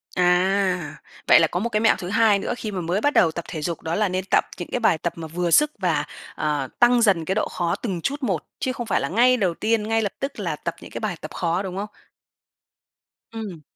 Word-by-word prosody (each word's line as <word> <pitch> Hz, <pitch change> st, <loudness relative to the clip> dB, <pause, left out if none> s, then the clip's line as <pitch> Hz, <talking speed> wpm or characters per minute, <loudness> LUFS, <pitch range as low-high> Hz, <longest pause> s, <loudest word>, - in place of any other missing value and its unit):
À, 180 Hz, -1 st, +1 dB, 0.3 s
vậy -, -, +8 dB
là 165 Hz, -, +4 dB
có 175 Hz, -, -2 dB
một 235 Hz, +5 st, -1 dB
cái 210 Hz, -2 st, 0 dB
mẹo 220 Hz, -, +4 dB
thứ 175 Hz, -, -6 dB
hai 220 Hz, -1 st, +4 dB
nữa -, -, -2 dB
khi 215 Hz, -, -5 dB
mà 190 Hz, -3 st, -3 dB
mới 175 Hz, +5 st, -1 dB
bắt 290 Hz, +3 st, +2 dB
đầu 165 Hz, -, +4 dB
tập 170 Hz, +1 st, -6 dB
thể 160 Hz, -3 st, -5 dB
dục 165 Hz, +2 st, -3 dB
đó 160 Hz, +1 st, -2 dB
là 210 Hz, 0 st, +1 dB
nên 185 Hz, +1 st, -2 dB
tập -, -, +2 dB
những 175 Hz, -, -6 dB
cái -, -, -1 dB
bài 220 Hz, -8 st, +3 dB
tập 170 Hz, +2 st, -3 dB
mà 165 Hz, -1 st, -7 dB
vừa 170 Hz, +2 st, -2 dB
sức 300 Hz, -, +5 dB
và, 170 Hz, -6 st, 0 dB, 0.3 s
ờ, 150 Hz, -3 st, -1 dB
tăng 240 Hz, 0 st, +5 dB
dần 190 Hz, -8 st, +3 dB
cái 190 Hz, -, -1 dB
độ 215 Hz, -, 0 dB
khó 170 Hz, -1 st, -1 dB
từng 190 Hz, -8 st, -4 dB
chút 285 Hz, -, -3 dB
một, -, -, -1 dB, 0.2 s
chứ 260 Hz, -, -1 dB
không 240 Hz, -, -5 dB
phải 200 Hz, -, +1 dB
là 140 Hz, -, -2 dB
ngay 245 Hz, +6 st, +4 dB
đầu 190 Hz, -7 st, +1 dB
tiên, 215 Hz, +3 st, 0 dB
ngay 225 Hz, 0 st, +2 dB
lập 205 Hz, -3 st, -2 dB
tức 275 Hz, -3 st, -4 dB
là 170 Hz, -6 st, -2 dB
tập 170 Hz, +2 st, -5 dB
những -, -, -11 dB
cái -, -, -5 dB
bài 210 Hz, -5 st, -2 dB
tập -, -, -7 dB
khó, 170 Hz, +1 st, -1 dB
đúng 190 Hz, -1 st, -5 dB
không? 205 Hz, +2 st, -3 dB, 1.5 s
Ừm. 205 Hz, -8 st, -6 dB
190 Hz, 255 wpm, -23 LUFS, 170-220 Hz, 1.5 s, vậy